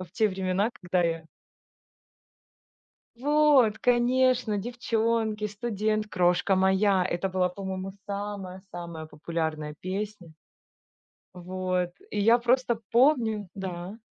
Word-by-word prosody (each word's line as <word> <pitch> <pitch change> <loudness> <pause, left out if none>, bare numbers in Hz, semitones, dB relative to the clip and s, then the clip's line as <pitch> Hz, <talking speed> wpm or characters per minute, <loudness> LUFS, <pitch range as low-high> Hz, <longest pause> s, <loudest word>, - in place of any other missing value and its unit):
в 185 -2 -8
те 215 +2 +2
времена, 190 +2 0
когда 180 0 +1
я 165 -1 -1 1.9
Вот, 285 -4 +4
конечно, 245 -2 +2
"Девчонки", 225 -1 -1
"Студент", 215 0 -1
"Крошка 180 0 +2
моя". 190 0 +3
Это 185 +1 -1
была, 185 -1 +1
по-моему, 190 0 -5 0.2
самая-самая 190 -5 -6
популярная 155 -1 -4
песня. 190 -2 -5 1.0
Вот, 180 0 -2 0.2
и 210 - -2
я 225 +4 +5
просто 240 -1 +1
помню 230 -6 +3
Да? 190 +1 -6
200 Hz, 100 wpm, -27 LUFS, 180-225 Hz, 1.9 s, я